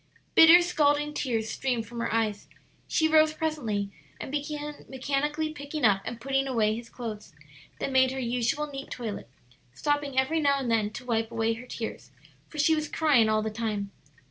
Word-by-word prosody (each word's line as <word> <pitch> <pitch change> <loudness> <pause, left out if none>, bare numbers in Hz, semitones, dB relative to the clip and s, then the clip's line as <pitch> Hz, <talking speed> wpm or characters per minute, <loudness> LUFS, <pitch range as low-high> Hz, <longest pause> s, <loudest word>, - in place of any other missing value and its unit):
Bitter, 335 +2 +9
scalding 295 -3 +2
tears 225 -6 -1
streamed 245 -4 -1
from 235 +2 -8
her 235 - -1
eyes. 215 -2 -1 0.4
She 315 - +2
rose 310 0 +5
presently 230 -12 -2 0.3
and - - -6
began 295 0 -4
mechanically 295 +4 -1
picking 285 -1 -3
up 200 -2 +4
and 235 - -5
putting 270 +2 0
away 220 -4 +1
his 230 0 -8
clothes, 215 -8 -7 0.4
then 270 - -3
made 260 0 +5
her 265 - -5
usual 250 +5 0
neat 275 -2 -8
toilet, 215 - -6 0.5
stopping 290 - -1
every 280 +5 +2
now 280 -2 +3
and 260 -4 -2
then 220 -2 +2
to 215 - -9
wipe 225 -2 0
away 225 0 0
her 240 +3 -9
tears, 230 -2 -6 0.4
for 310 - -12
she 300 +2 +4
was 305 -1 -1
crying 275 -9 +3
all 215 0 +2
the 220 - -2
time. 210 -3 -3
260 Hz, 180 wpm, -27 LUFS, 225-295 Hz, 0.5 s, Bitter